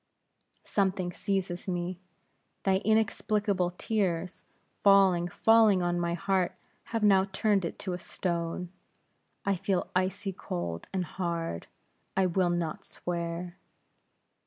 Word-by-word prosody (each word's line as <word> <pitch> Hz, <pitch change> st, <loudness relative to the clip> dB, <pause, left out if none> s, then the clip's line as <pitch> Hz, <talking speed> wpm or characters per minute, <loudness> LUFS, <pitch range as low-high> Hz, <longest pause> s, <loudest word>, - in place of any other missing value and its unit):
"Something 190 Hz, -3 st, 0 dB
seizes 190 Hz, -2 st, -2 dB
me. 175 Hz, 0 st, -2 dB, 0.6 s
Thy 190 Hz, -1 st, +3 dB
inexplicable 210 Hz, -3 st, +1 dB
tears, 180 Hz, -2 st, -2 dB, 0.4 s
falling, 195 Hz, -3 st, +5 dB
falling 215 Hz, 0 st, +5 dB
on 175 Hz, 0 st, +1 dB
my 170 Hz, 0 st, 0 dB
heart, 190 Hz, 0 st, 0 dB, 0.3 s
have 225 Hz, -2 st, -2 dB
now 195 Hz, -2 st, +5 dB
turned 195 Hz, -1 st, +1 dB
it 170 Hz, -, -4 dB
to 185 Hz, -3 st, -4 dB
a 180 Hz, -, -4 dB
stone. 170 Hz, 0 st, -3 dB, 0.7 s
I 200 Hz, 0 st, +2 dB
feel 190 Hz, 0 st, -1 dB
icy 190 Hz, +2 st, 0 dB
cold 85 Hz, -, -4 dB
and 185 Hz, -2 st, -1 dB
hard; 170 Hz, -, -3 dB, 0.5 s
I 190 Hz, -, +4 dB
will 180 Hz, 0 st, +2 dB
not 175 Hz, -2 st, -2 dB
swear!" 170 Hz, 0 st, -4 dB
185 Hz, 115 wpm, -29 LUFS, 175-195 Hz, 0.7 s, falling